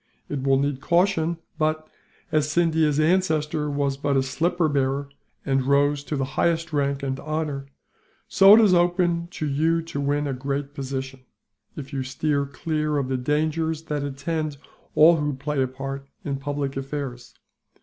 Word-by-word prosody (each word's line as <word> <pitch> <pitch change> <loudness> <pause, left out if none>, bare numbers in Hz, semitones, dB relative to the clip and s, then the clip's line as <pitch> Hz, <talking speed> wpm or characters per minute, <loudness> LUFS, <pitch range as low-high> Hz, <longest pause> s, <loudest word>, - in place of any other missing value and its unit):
It 145 -2 -3
will 135 0 +3
need 140 -1 -1
caution 170 -1 +2 0.2
but, 155 0 0 0.4
as 155 -1 +2
Scindia's 160 -2 +2
ancestor 155 -3 +1
was 140 -1 -1
but 140 0 0
a 135 - +3
slipper 165 +5 0
bearer, 140 -1 0 0.4
and 135 -1 +2
rose 140 +2 +2
to 150 - -3
the 135 -1 -1
highest 165 +4 0
rank 140 -1 0
and 135 -1 -2
honour; 150 -3 -3 0.6
so 195 +2 +8
it 230 - +6
is 205 -4 +5
open 175 -1 +2
to 165 -3 -5
you 160 +4 +1
to 150 -3 -5
win 145 +1 0
a 140 - -2
great 140 +2 -3
position, 135 -1 -5 0.6
if 140 -1 -8
you 135 - -1
steer 140 +2 -1
clear 150 +1 -2
of 135 -2 -1
the 130 - 0
dangers 155 +4 -1
that 150 -2 -3
attend 145 +2 -3 0.4
all 165 +2 +7
who 150 -2 -1
play 140 +1 -2
a 130 - +2
part 135 +1 -6 0.2
in 140 -1 -2
public 140 0 -3
affairs. 135 -3 -5
145 Hz, 165 wpm, -24 LUFS, 135-160 Hz, 0.6 s, so